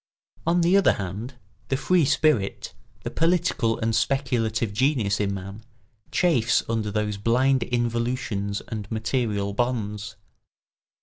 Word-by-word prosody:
On 175 +1 +3
the 175 +3 +4
other 200 - +5
hand, 105 +7 -5 0.3
the 135 - 0
free 175 +2 +3
spirit, 130 -9 +1 0.3
the - - -4
political 165 -9 +1
and 115 0 0
speculative 115 -5 0
genius 110 -4 +1
in 100 -1 0
man, 100 +3 -7 0.5
chafes 165 -11 +2
under 110 -2 -1
those 105 0 -1
blind 125 +5 +2
involutions 115 -4 -1
and 105 -2 -5
material 110 -3 -1
bonds. 110 -3 -2
115 Hz, 120 wpm, -25 LUFS, 105-130 Hz, 0.5 s, other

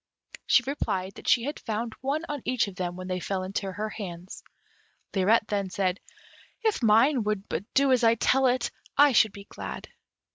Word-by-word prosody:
She - - +5
replied 195 -9 -2
that - - -12
she 235 - +4
had 290 +4 -4
found 225 +1 -3
one 280 +4 -1
on 290 -3 -4
each 250 -4 +1
of 195 - -8
them 175 -1 -3
when 185 0 -7
they 185 0 -2
fell 185 +1 -3
into 195 +1 -3
her 215 +3 -4
hands. 185 -4 -8 0.7
Lirette 210 +3 +3
then 200 -2 -1
said, 185 0 -1 0.6
"If 440 -8 +1
mine 230 +5 +4
would 210 -2 -2
but 195 +8 -5
do 275 0 +4
as 255 -2 +3
I 230 0 +5
tell 265 +3 +3
it, 255 +1 0 0.3
I 290 0 +7
should 220 -3 +4
be 200 0 -11
glad." - - -8
215 Hz, 190 wpm, -27 LUFS, 190-255 Hz, 0.7 s, I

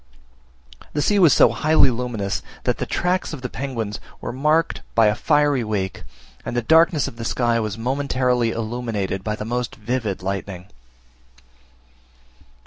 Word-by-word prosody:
The 150 - 0
sea 205 -1 +3
was 170 -6 +7
so 125 - +6
highly 150 +4 +3
luminous, 115 -5 -3 0.2
that - - 0
the - - -2
tracks 180 0 -1
of 135 -4 -7
the 125 - -3
penguins 115 -6 -4 0.2
were - - -5
marked 155 +5 +1
by 115 -1 +5
a 105 - +4
fiery 145 +2 +2
wake, 100 -3 -3 0.4
and 120 - -4
the 120 - 0
darkness 160 +2 +4
of 115 - -9
the 115 - -5
sky 120 0 +1
was 110 -1 -3
momentarily 125 -1 0
illuminated 110 -4 -3
by 105 +1 -2
the 105 - -6
most 120 +1 -3
vivid 110 -4 -3
lightning. 95 -1 -4
120 Hz, 150 wpm, -22 LUFS, 110-140 Hz, 0.4 s, was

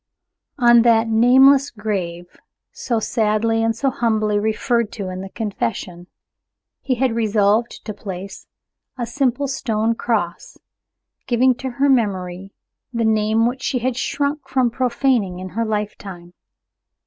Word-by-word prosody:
On 240 -2 +6
that 230 -1 +4
"nameless 265 +5 +5
grave," 190 -6 -4 0.5
so 265 - -2
sadly 225 0 0
and 225 0 +1
so 270 +4 0
humbly 215 -4 0
referred 220 +1 0
to 195 -4 -5
in 185 0 -6
the 195 - -7
confession, 195 -5 -4 0.7
he 260 - -1
had 255 -1 0
resolved 215 0 +1
to 215 - -5
place 195 -1 -8 0.5
a 240 - -2
simple 270 +2 -1
stone 230 -4 -1
cross, 225 - -3 0.7
giving 255 +1 +3
to 260 +2 -6
her 280 +1 +3
memory 195 -7 0 0.4
the 230 -2 -1
name 220 +1 +2
which 250 +2 -2
she 265 - -1
had 250 +1 -1
shrunk 285 +2 -2
from 255 -3 +1
profaning 245 -6 0
in 185 +1 -7
her 230 +5 -2
lifetime. 200 -5 -5
225 Hz, 135 wpm, -20 LUFS, 205-250 Hz, 0.7 s, On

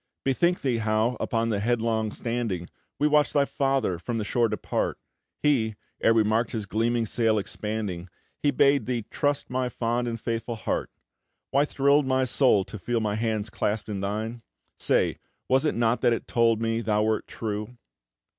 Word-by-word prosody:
Bethink 170 +7 +2
thee, 125 -4 +1
how, 110 +2 +1
upon 115 0 0
the 105 -3 0
headland 110 -1 0
standing, 115 -8 -2 0.3
We 150 - +3
watched 150 -1 +3
thy 140 -1 +4
father 135 -11 0
from 115 +5 -3
the 110 - -1
shore 115 +2 +1
depart, - - -2 0.5
He, 115 -8 +2 0.3
ere 115 - +4
we 110 - +5
mark'd 110 +2 +1
his 110 -3 -2
gleaming 115 +3 0
sail 110 0 +2
expanding, 105 -3 -4 0.3
He 145 - +3
bade 140 -3 +3
thee 120 -4 -1
trust 145 -3 -1
my 125 0 0
fond 120 +1 -1
and 115 -1 -3
faithful 115 +1 -3
heart, 110 - -2 0.6
Why 140 +2 +4
thrill'd 140 0 +3
my 130 0 +2
soul 125 -5 +3
to 105 - -8
feel 120 +5 -1
my 105 -2 -1
hand 110 -1 -1
clasp'd 105 +1 -2
in 100 -2 -3
thine? 110 +4 -3 0.4
Say, - - +1 0.3
was 130 +3 +3
it 150 - +1
not 115 0 +1
that 120 - +4
it - - -3
told 115 -1 +2
me 115 0 0
thou 105 -1 +1
wert 110 0 0
true?" 110 +2 -5
115 Hz, 175 wpm, -26 LUFS, 110-125 Hz, 0.6 s, we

